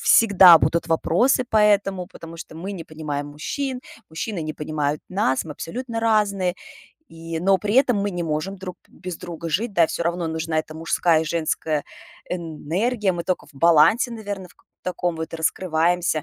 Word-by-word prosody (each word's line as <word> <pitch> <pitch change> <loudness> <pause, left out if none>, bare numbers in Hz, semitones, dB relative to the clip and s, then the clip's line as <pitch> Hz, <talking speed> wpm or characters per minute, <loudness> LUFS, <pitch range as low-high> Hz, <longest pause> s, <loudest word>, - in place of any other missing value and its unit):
всегда 190 -6 +8
будут 165 +4 0
вопросы 175 +11 +2
по 220 - -2
этому, 200 -3 +3
потому 165 0 -11
что 160 - -10
мы 180 +5 -6
не 170 -4 -7
понимаем 150 -2 -5
мужчин, 250 - -4 0.3
мужчины 165 +4 -4
не 155 0 -4
понимают 150 -1 -2
нас, 180 -9 0
мы 160 - -9
абсолютно 230 - -5
разные, 205 -5 +1 0.5
и, 165 0 -6
но 190 +1 +3
при 210 +1 -2
этом 255 -4 +4
мы 200 0 -1
не 175 -1 -3
можем 160 +5 -2
друг 185 -1 -8
без 180 -2 -8
друга 170 -1 -7
жить, 205 +8 -1
да. 170 -3 +4
Всё 170 - -3
равно 170 -1 -1
нужна 160 0 -2
эта 155 0 -11
мужская 165 0 +2
и - - -4
женская 155 -2 -1 0.5
энергия. 180 +6 -1
Мы 170 -1 -4
токо 185 -4 -2
в - - -19
балансе, 170 - +4
наверно, 205 -4 -6
в - - -21 0.3
таком 175 -2 -2
вот 160 +1 -5
раскрываемся. 165 -1 0
170 Hz, 175 wpm, -23 LUFS, 160-200 Hz, 0.5 s, всегда